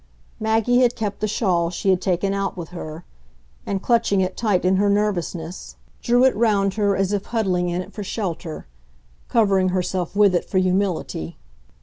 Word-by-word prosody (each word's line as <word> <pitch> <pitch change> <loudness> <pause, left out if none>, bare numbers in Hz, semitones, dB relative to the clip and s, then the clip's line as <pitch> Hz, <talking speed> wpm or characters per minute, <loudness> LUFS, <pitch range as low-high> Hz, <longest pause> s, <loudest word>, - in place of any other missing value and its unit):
Maggie 225 +3 +2
had 245 -1 +3
kept 210 -2 -3
the 215 - 0
shawl 180 -6 +1
she 185 +2 0
had 185 - +1
taken 190 +1 0
out 195 -1 -2
with 170 -2 -6
her, 165 -1 -8 0.6
and, 195 -1 -2
clutching 230 -4 +2
it 185 0 0
tight 205 -6 0
in 185 +1 +3
her 205 +1 +2
nervousness, 185 -4 -2 0.3
drew 245 +1 +3
it 260 - +3
round 200 -3 +2
her 205 -2 +1
as 195 +1 0
if 205 -1 -1
huddling 185 -6 0
in 175 +1 -2
it 195 - -16
for 210 - -5
shelter, 180 -6 -4 0.6
covering 195 -5 +3
herself 185 0 -2
with 205 -2 +5
it 175 - 0
for 190 - 0
humility. 185 - -1
195 Hz, 180 wpm, -22 LUFS, 180-210 Hz, 0.6 s, with